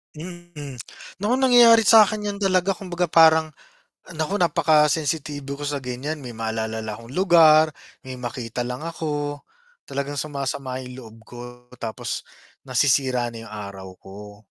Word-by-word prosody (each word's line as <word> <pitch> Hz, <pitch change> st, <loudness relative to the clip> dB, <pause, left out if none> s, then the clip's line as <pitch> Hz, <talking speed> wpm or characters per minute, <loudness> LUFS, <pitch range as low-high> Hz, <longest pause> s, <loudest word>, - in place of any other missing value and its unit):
Mm, 160 Hz, -5 st, -9 dB, 0.4 s
naku 210 Hz, +5 st, 0 dB
nangyayari 240 Hz, -3 st, +6 dB
sa'kin 215 Hz, -1 st, +5 dB
'yan 200 Hz, -, -8 dB
talaga 190 Hz, -1 st, +2 dB
kumbaga 180 Hz, -3 st, -3 dB
parang 160 Hz, -1 st, +5 dB, 0.6 s
naku 160 Hz, +6 st, -2 dB
napakensitibo 150 Hz, -4 st, +1 dB
ko 145 Hz, -, -6 dB
sa 145 Hz, -1 st, -3 dB
ganiyan, 135 Hz, +5 st, -5 dB
may 125 Hz, -, -7 dB
maalalala 110 Hz, 0 st, -3 dB
lang 110 Hz, -1 st, -5 dB
akong 115 Hz, +2 st, -12 dB
lugar, 165 Hz, -4 st, +6 dB, 0.4 s
may 130 Hz, -, -6 dB
makita 120 Hz, -1 st, -5 dB
lang 125 Hz, +3 st, -5 dB
ako, 145 Hz, -3 st, -4 dB, 0.4 s
talagang 140 Hz, +1 st, -4 dB
sumasama 135 Hz, -3 st, -4 dB
'yung 125 Hz, 0 st, -9 dB
loob 110 Hz, -1 st, -13 dB
ko 120 Hz, -, -12 dB, 0.4 s
tapos 110 Hz, -1 st, -4 dB, 0.4 s
nasisira 130 Hz, -2 st, +1 dB
na 115 Hz, -, -8 dB
'yung -, -, -12 dB
araw 100 Hz, -2 st, -8 dB
ko. 105 Hz, +1 st, -12 dB
145 Hz, 135 wpm, -23 LUFS, 125-170 Hz, 0.6 s, nangyayari